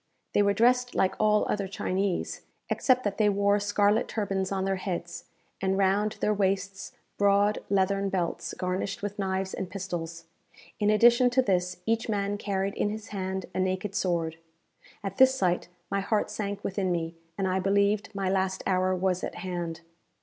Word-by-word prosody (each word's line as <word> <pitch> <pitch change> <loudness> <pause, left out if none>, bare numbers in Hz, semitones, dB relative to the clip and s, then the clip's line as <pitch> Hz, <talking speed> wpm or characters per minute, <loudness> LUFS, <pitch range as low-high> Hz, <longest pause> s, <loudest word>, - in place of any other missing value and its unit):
They - - +4
were 200 0 +3
dressed 245 +3 +3
like 190 - +2
all 210 0 +3
other 200 -2 -1
Chinese, 190 0 -2 0.3
except 255 -1 +3
that 205 0 -2
they 210 -1 +5
wore 200 0 +3
scarlet 205 +2 +2
turbans 195 -3 -2
on 190 -1 -1
their 195 0 0
heads, 175 -2 -5 0.4
and 190 0 +1
round 200 +2 +2
their 210 - +2
waists 195 -1 -1 0.3
broad 205 +1 +3
leathern 195 0 +2
belts 175 -3 -2
garnished 185 +2 -2
with 205 0 -4
knives 190 -1 -1
and 185 - -4
pistols. 170 -3 -5 0.5
In 210 -1 +2
addition 240 +3 +6
to 260 +1 +3
this, 180 -4 0
each 225 0 0
man 205 -1 -1
carried 195 -1 -1
in 205 - 0
his 215 0 -6
hand 190 -2 -3
a - - -2
naked 185 +2 -1
sword. 170 -5 -1 0.7
At 195 -1 -4
this 260 0 +6
sight 180 -7 0 0.2
my 200 - +1
heart 205 +2 0
sank 205 -1 -4
within 190 -1 -1
me, 165 -1 -2 0.2
and 195 - 0
I 185 0 +1
believed 200 +2 +2
my 195 -1 -1
last 190 0 0
hour 185 0 +2
was 185 0 0
at - - -4
hand. 175 -3 -4
195 Hz, 170 wpm, -28 LUFS, 185-205 Hz, 0.7 s, addition